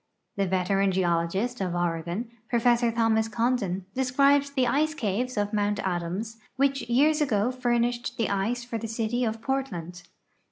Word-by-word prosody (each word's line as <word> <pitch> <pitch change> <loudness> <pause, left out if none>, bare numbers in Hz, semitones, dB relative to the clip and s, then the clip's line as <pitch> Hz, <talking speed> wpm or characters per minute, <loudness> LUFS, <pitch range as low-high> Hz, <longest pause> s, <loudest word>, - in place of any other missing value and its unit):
The 195 -1 0
veteran 190 +1 +1
geologist 185 +6 0
of 180 -2 -1
Oregon, 175 +6 -2 0.2
Prof. 240 0 +3
Thomas 225 -1 +2
Condon, 225 -5 -1
describes 275 +2 +3
the 265 -2 +1
ice 300 +5 +1
caves 240 0 -2
of 205 +1 -1
Mount 205 0 +1
Adams, 185 +5 -3 0.2
which 275 +1 +1
years 300 +6 +3
ago 235 -4 +1
furnished 240 -1 -1
the 230 - +1
ice 220 +5 -1
for 240 -1 -4
the 225 - -4
city 225 +2 -1
of 225 -1 -2
Portland. 180 -11 -3
225 Hz, 150 wpm, -27 LUFS, 195-250 Hz, 0.2 s, Prof